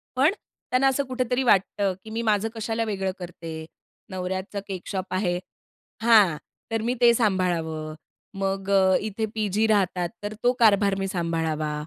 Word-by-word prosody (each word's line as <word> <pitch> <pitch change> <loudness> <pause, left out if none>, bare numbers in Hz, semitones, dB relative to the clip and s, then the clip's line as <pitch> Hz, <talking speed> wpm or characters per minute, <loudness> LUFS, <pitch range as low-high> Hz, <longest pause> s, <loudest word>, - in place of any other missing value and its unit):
पण 275 +8 +4 0.4
त्यांना 260 +2 +4
असं 270 +1 +2
कुठेतरी 255 0 -1
वाटतं, 200 -3 +2
की 220 - -10
मी 225 +1 -3
माझं 210 +1 +2
कशाला 225 +1 -2
वेगळं 195 -3 -2
करते, 165 -3 -7 0.4
नवऱ्याचं 190 +1 -4
केक 190 -3 -6
शॉप 190 -2 -4
आहे 180 -2 0 0.6
हां. 210 -9 +6 0.3
तर 225 -1 0
मी 240 +2 0
ते 240 -1 +7
सांभाळावं. 175 -8 0 0.5
मग 195 0 -2
अ, 190 -1 +5
इथे 215 +1 -2
पीजी 215 +1 +1
राहतात, 185 -4 +1
तर 205 - -3
तो 245 - +4
कारभार 200 -3 +4
मी 195 - -1
सांभाळावा. 165 -4 -1
195 Hz, 150 wpm, -25 LUFS, 180-225 Hz, 0.6 s, ते